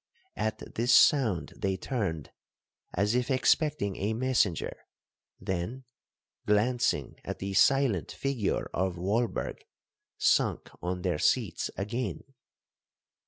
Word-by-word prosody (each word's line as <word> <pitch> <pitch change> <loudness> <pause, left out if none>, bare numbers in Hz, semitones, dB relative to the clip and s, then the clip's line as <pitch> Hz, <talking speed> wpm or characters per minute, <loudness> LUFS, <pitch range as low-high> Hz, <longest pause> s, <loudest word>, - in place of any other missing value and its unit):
At 110 - -3
this 120 +3 +1
sound 115 - +4
they 95 -1 -1
turned, 90 - -3 0.6
as 100 +4 +1
if 125 +1 0
expecting 130 - +2
a 105 +3 -1
messenger, 120 -8 +1 0.6
then, 95 +7 -3 0.6
glancing 115 +4 +1
at - - -5
the 95 0 -4
silent 135 - +3
figure 135 -7 -1
of 95 0 0
Walberg, 105 +6 -1 0.6
sunk - - +2
on 90 0 -3
their 90 -5 0
seats - - +1
again. 105 -1 -3
105 Hz, 105 wpm, -29 LUFS, 95-125 Hz, 0.6 s, sound